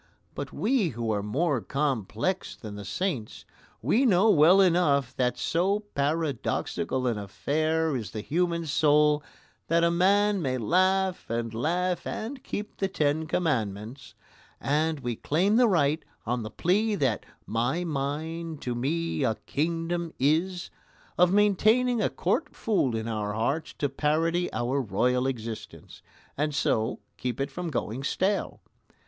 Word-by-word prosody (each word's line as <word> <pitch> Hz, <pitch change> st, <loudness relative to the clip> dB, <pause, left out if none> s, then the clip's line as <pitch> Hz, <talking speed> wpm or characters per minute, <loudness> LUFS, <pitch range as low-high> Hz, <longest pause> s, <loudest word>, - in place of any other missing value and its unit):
But -, -, -5 dB
we 225 Hz, -6 st, +1 dB
who 115 Hz, -2 st, -1 dB
are 105 Hz, -1 st, 0 dB
more 135 Hz, +5 st, 0 dB
complex 135 Hz, -, -2 dB
than 110 Hz, -3 st, -9 dB
the 105 Hz, -, -7 dB
saints 130 Hz, -, -3 dB, 0.4 s
we 210 Hz, -, +3 dB
know 215 Hz, -2 st, +5 dB
well 165 Hz, +4 st, +6 dB
enough 160 Hz, -8 st, +3 dB
that 125 Hz, -1 st, 0 dB
so 185 Hz, +10 st, +1 dB
paradoxical 140 Hz, -3 st, -1 dB
an 115 Hz, -4 st, 0 dB
affair 155 Hz, +9 st, 0 dB
is 115 Hz, -4 st, -4 dB
the 110 Hz, -, -5 dB
human 170 Hz, +4 st, 0 dB
soul 150 Hz, 0 st, +3 dB, 0.5 s
that 170 Hz, +1 st, +3 dB
a 170 Hz, -, +4 dB
man 200 Hz, +3 st, +3 dB
may 130 Hz, -4 st, -1 dB
laugh 185 Hz, -, +1 dB
and 115 Hz, 0 st, -2 dB
laugh 175 Hz, +9 st, -1 dB
and 255 Hz, +5 st, -5 dB
keep 210 Hz, +1 st, -5 dB
the 195 Hz, -, 0 dB
Ten 155 Hz, -3 st, 0 dB
Commandments; 120 Hz, -, -2 dB, 0.4 s
and 155 Hz, +1 st, 0 dB
we 120 Hz, -2 st, -2 dB
claim 185 Hz, -, +1 dB
the 245 Hz, -1 st, +6 dB
right, 155 Hz, -5 st, +2 dB, 0.2 s
on 120 Hz, +2 st, -1 dB
the 110 Hz, -, -5 dB
plea 205 Hz, -, +1 dB
that 130 Hz, -, 0 dB, 0.2 s
"my 120 Hz, +10 st, 0 dB
mind 160 Hz, +2 st, -3 dB
to 125 Hz, -, -2 dB
me 150 Hz, +5 st, -1 dB
a 115 Hz, -4 st, +1 dB
kingdom 165 Hz, +2 st, -2 dB
is," 170 Hz, +6 st, 0 dB, 0.4 s
of 180 Hz, 0 st, +4 dB
maintaining 215 Hz, +4 st, +3 dB
a -, -, +2 dB
court -, -, -1 dB
fool 185 Hz, -, +1 dB
in 110 Hz, 0 st, -3 dB
our 105 Hz, -2 st, -2 dB
hearts 135 Hz, +9 st, -1 dB
to 145 Hz, -, -1 dB
parody 160 Hz, +5 st, 0 dB
our 130 Hz, +3 st, 0 dB
royal 125 Hz, +4 st, +1 dB
existence, 115 Hz, -4 st, -6 dB, 0.3 s
and 150 Hz, 0 st, -1 dB
so 110 Hz, -4 st, 0 dB, 0.2 s
keep 125 Hz, 0 st, -3 dB
it 135 Hz, +1 st, -2 dB
from 175 Hz, +3 st, -4 dB
going 125 Hz, -2 st, -3 dB
stale. 195 Hz, +7 st, -1 dB
150 Hz, 145 wpm, -27 LUFS, 125-180 Hz, 0.5 s, well